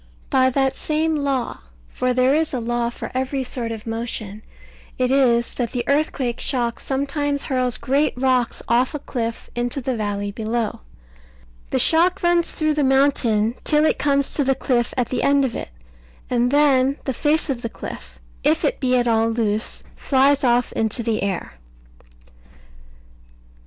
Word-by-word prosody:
By 260 -2 +4
that 270 +1 +1
same 315 +3 -1
law 275 -4 -1 0.3
(for 255 - -1
there 255 +2 +3
is 310 -2 0
a - - -1
law 240 0 -1
for 240 - -7
every 265 +1 -1
sort 245 -2 -4
of 220 -2 -7
motion) 225 -2 -5 0.6
it 255 0 +1
is 240 -4 +3
that 240 -1 -3
the 245 -2 -1
earthquake 280 -4 0
shock 240 -3 -1
sometimes 285 +1 -1
hurls 255 -2 0
great 280 +3 +1
rocks 255 -2 +1
off 245 +5 +2
a - - -3
cliff 230 -4 -5
into 240 +3 -2
the 260 -1 -2
valley 205 -2 -2
below. 220 +1 -2 0.9
The - - 0
shock 355 +4 +3
runs 345 -1 +3
through 310 -1 +1
the 300 -1 0
mountain 260 -5 +2
till 300 0 +3
it - - +1
comes 280 -1 +1
to 290 - 0
the 270 0 +2
cliff 245 -3 0
at 245 -3 0
the 255 - -1
end 280 -1 +3
of 240 - -3
it; - - -5 0.6
and 245 0 +2
then 275 -1 +3
the 265 - -2
face 300 +3 +1
of 245 -3 -4
the 230 - -3
cliff, - - -9 0.3
if - - +2
it - - 0
be 255 -1 +2
at 245 -1 +1
all 225 0 +2
loose, 220 -1 -1
flies 275 +1 +2
off 245 -1 +2
into 225 +2 -1
the 225 -1 -1
air. 185 - -4
255 Hz, 165 wpm, -21 LUFS, 235-280 Hz, 0.9 s, By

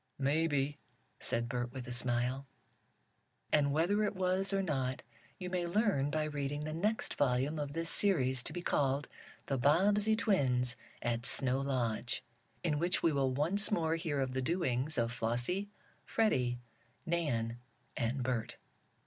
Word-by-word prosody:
"Maybe," 145 0 +1 0.4
said 120 0 -1
Bert 120 0 -2
with 130 -2 -6
a - - -5
smile. 125 +2 0 1.1
And 145 -2 +4
whether 175 +8 +2
it 210 - 0
was 185 +1 +1
or 195 0 +1
not 130 -6 -1 0.3
you 180 - -5
may 180 -1 -1
learn 175 -7 +2
by 155 +1 0
reading 145 -1 -2
the 155 0 -3
next 210 +7 0
volume 140 +3 +1
of 145 -1 -3
this 165 +1 -1
series, 130 -11 +2
to - - -2
be 175 - -5
called: 140 -2 +1 0.4
"The 135 -2 -1
Bobbsey 200 - +4
Twins 130 - +2 0.3
at 120 +1 0
Snow 130 -1 +3
Lodge," 125 -3 -1 0.4
in 150 -4 +1
which 175 +2 0
we 165 - +4
will 135 -2 +2
once 170 +10 +1
more 165 -6 +1
hear 160 -4 -1
of 130 -1 -1
the 130 - 0
doings 150 -2 0
of 115 -1 +1
Flossie, 125 - -1 0.3
Freddie 125 - +1 0.5
Nan 120 -9 -1 0.4
and 120 +3 -1
Bert. 120 -3 -2
145 Hz, 150 wpm, -34 LUFS, 125-175 Hz, 1.1 s, And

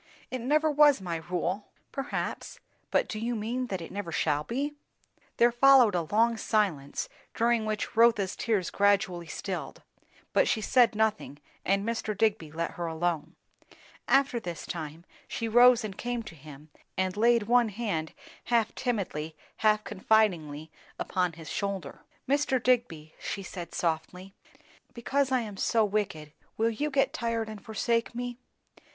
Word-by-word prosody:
"It 255 -1 -3
never 305 +5 +2
was 295 -3 +6
my 175 -3 -3
rule." 180 +4 -3 0.2
"Perhaps. 275 0 -4 0.3
But - - +2
do 215 - -5
you 235 +2 -2
mean 240 +4 -2
that 190 -5 -4
it 165 - -8
never 195 -3 -5
shall 150 -2 +1
be?" 275 - -2 0.6
There 240 +1 +5
followed 250 -3 +6
a 170 -3 -1
long 230 +2 +3
silence, 185 -12 0 0.3
during 230 -1 +2
which 215 -1 -3
Rotha's 225 -4 +4
tears 205 -6 0
gradually 200 -4 +2
stilled; - - -5 0.5
but - - +4
she - - +1
said 235 +2 +4
nothing, 215 -9 0 0.3
and 195 +1 +1
Mr. 220 -3 -2
Digby 205 -8 +1
let 165 +2 -3
her 170 -1 -4
alone. 165 -1 -2 0.7
After 275 -2 +3
this 175 -6 -6
time, 160 0 -6 0.2
she 230 - -3
rose 240 +1 +6
and 205 -3 -5
came 240 +2 -3
to 220 -7 -10
him 150 0 -13 0.3
and 185 -1 0
laid 235 +1 +4
one 240 +1 +3
hand 200 -7 -3 0.3
half 230 -2 +1
timidly, 185 - -3 0.2
half 215 -1 +3
confidingly, 175 -8 +1 0.3
upon 180 -2 -1
his 160 -1 -11
shoulder. 195 -8 -4 0.3
"Mr. 280 -1 +2
Digby," 200 -12 0
she 200 - -4
said 175 -2 -7
softly, 180 +3 -2 0.6
"because 265 +3 0
I 255 -1 +3
am 210 -3 -7
so 225 +2 +2
wicked, 190 -8 -2 0.2
will 225 +1 +2
you 290 +7 -2
get 275 0 +1
tired 230 -5 -1
and 215 -2 -9
forsake 230 +1 -1
me?" 245 0 -4
215 Hz, 150 wpm, -28 LUFS, 175-235 Hz, 0.7 s, was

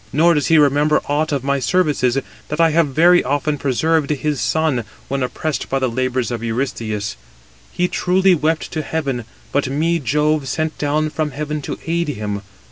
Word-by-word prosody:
Nor 170 +4 +4
does 150 -2 +1
he 165 - +5
remember 150 +1 +4
aught 150 +2 0
of 140 -3 -1
my 140 0 +1
services, 140 -4 +1 0.3
that 150 - -4
I 165 -1 +5
have 165 0 +3
very 170 +6 +5
often 145 +2 -1
preserved 150 +3 +1
his 150 -1 -1
son, 155 -7 +1 0.3
when 135 +1 -1
oppressed 145 +4 -3
by 135 - +1
the 130 -1 +1
labours 130 0 -1
of 120 -2 -3
Eurystheus. 115 - -2 0.6
He 180 0 0
truly 185 +1 +3
wept 160 0 0
to 155 - -2
heaven; 140 -7 -3 0.3
but 140 -2 0
me 165 +5 +1
Jove 150 +2 +1
sent 155 +5 -2
down 150 +1 0
from 155 0 -1
heaven 150 +1 -4
to - - -5
aid 170 +1 0
him. 105 -7 -3
150 Hz, 180 wpm, -19 LUFS, 130-160 Hz, 0.6 s, he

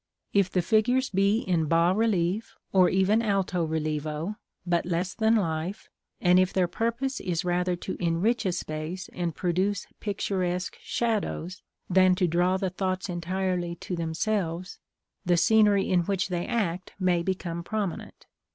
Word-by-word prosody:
If 200 -2 +3
the 180 -1 0
figures 245 +7 +2
be 200 +3 +2
in 170 -4 +1
bas 170 +4 +3
relief, 210 -1 0 0.2
or 185 -2 +6
even 190 +4 +3
alto 195 -5 0
relievo, 155 +4 -2 0.3
but 175 -1 +1
less 180 +1 -2
than 220 0 +3
life, 170 0 -2 0.3
and 180 0 +5
if 185 0 +2
their 185 -2 +2
purpose 235 +8 -2
is 175 -1 -2
rather 180 0 +1
to 180 - -5
enrich 185 +8 +1
a - - +1
space 160 +2 -5
and 175 -3 -2
produce 185 +2 0
picturesque 185 -3 -2
shadows, 205 -6 -2 0.3
than 185 0 +5
to 180 - +2
draw 175 +3 +2
the 190 -1 -2
thoughts 185 +1 -2
entirely 180 0 -2
to 180 +2 -5
themselves, 170 +2 -2 0.4
the 175 -2 +2
scenery 210 +1 +4
in 180 - +3
which 190 +2 -1
they 175 -1 -2
act 185 -6 -2
may 180 -2 +2
become 170 -2 -3
prominent. 205 -2 -4
185 Hz, 150 wpm, -27 LUFS, 170-200 Hz, 0.4 s, or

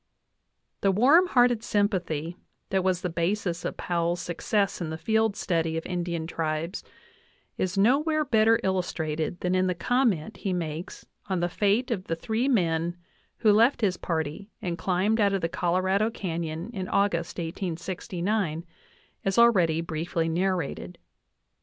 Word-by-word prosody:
The 195 - +2
warm 280 - +5
hearted 245 -6 +3
sympathy 180 -6 -1 0.4
that 190 -1 +2
was 185 -1 +1
the - - +1
basis 175 +1 -1
of - - -4
Powell's 170 0 -1
success 195 +3 -1
in 165 - -2
the 160 - -4
field 220 +4 +1
study 165 -4 -1
of 165 - -4
Indian 175 -2 -2
tribes 165 +2 -3 0.7
is 185 +1 -2
nowhere 300 +9 +3
better 225 -3 +4
illustrated 170 -3 -2
than 180 0 0
in 185 0 +2
the 180 - 0
comment 220 - 0
he 195 -3 -2
makes 165 -1 -5 0.2
on 190 -2 0
the 175 - +1
fate 210 +8 +1
of 190 -5 -2
the 165 - -2
three 220 +9 -1
men 170 -7 +1 0.4
who 215 - +4
left 230 +6 +4
his 190 -4 +1
party 160 +4 -3
and 175 -2 -3
climbed 190 +5 +1
out 200 -1 +3
of 195 - 0
the 165 - +1
Colorado 185 +5 +1
canyon 170 -1 -4
in 190 -3 -4
August, 180 -5 0
1869, 175 +1 -3 0.6
as 195 +2 0
already 180 -9 +5
briefly 165 0 -2
narrated. 175 - -2
185 Hz, 145 wpm, -27 LUFS, 165-210 Hz, 0.7 s, warm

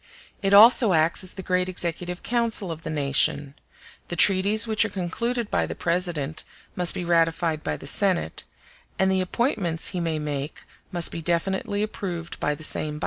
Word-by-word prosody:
It 195 -1 0
also 220 0 +7
acts 160 +3 +2
as 185 - -2
the 190 - -8
great 180 0 0
executive 175 0 -3
council 230 -6 -1
of 160 0 -7
the - - -7
nation; 140 -1 0 0.5
the 175 - -4
treaties 200 +5 +5
which 220 -1 +1
are - - -2
concluded 230 +6 -3
by - - 0
the - - -6
President 170 -4 -2 0.3
must 180 -1 +3
be 180 - -4
ratified 165 -2 +1
by - - -3
the - - -12
Senate, 180 - 0 0.5
and 190 0 +2
the 190 0 +1
appointments 185 - -1
he 180 - -4
may 165 -2 -2
make 145 -1 -5 0.3
must 175 -3 +2
be 165 - -6
definitely 190 +4 -1
approved 175 -5 -6
by 150 - -1
the 155 - -10
same 150 -1 0
body. - - -9
175 Hz, 180 wpm, -24 LUFS, 160-195 Hz, 0.5 s, also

